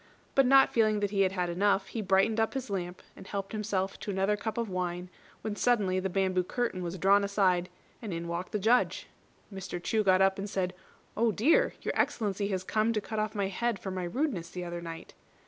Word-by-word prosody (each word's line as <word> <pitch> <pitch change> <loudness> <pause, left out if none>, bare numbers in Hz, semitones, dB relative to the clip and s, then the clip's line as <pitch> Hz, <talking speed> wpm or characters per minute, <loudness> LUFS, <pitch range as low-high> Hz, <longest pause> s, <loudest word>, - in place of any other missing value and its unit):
But 270 -2 +4
not 270 +1 +6
feeling 215 -2 +3
that 205 -1 0
he 200 -1 +1
had 190 -1 +2
had 180 -2 -1
enough, 195 +3 +1
he 225 - -3
brightened 195 +3 +2
up 225 +4 0
his 260 -5 -4
lamp, 180 -2 -4
and 190 - -12
helped 195 -1 -4
himself 200 -3 -2
to - - -6
another 195 +1 +1
cup 220 +2 -4
of 235 -1 -1
wine, 180 -1 -3 0.3
when 215 -1 -3
suddenly 205 -6 +2
the 190 +1 -2
bamboo 185 -1 +1
curtain 230 -1 -2
was 175 +1 -4
drawn 200 +3 +4
aside, 190 -3 +1 0.3
and 220 -4 -5
in 170 0 -4
walked 170 +2 -4
the - - 0
Judge. 225 +5 +2 0.5
Mr. 190 -2 -5
Chu 215 +5 0
got 185 -2 +4
up 190 0 +3
and 200 +1 -4
said, 185 -2 -1 0.4
"Oh, 230 +1 +2
dear! 320 - +3
Your - - -1
Excellency 205 -3 0
has 190 -2 -2
come 215 +4 +1
to 215 - +1
cut 215 +1 -4
off 215 +1 -2
my 200 -2 0
head 235 +3 -1
for 190 - -6
my 185 -1 -3
rudeness 185 - -2
the 180 +1 -6
other 170 0 -5
night." 165 -1 -8
195 Hz, 220 wpm, -30 LUFS, 185-215 Hz, 0.5 s, not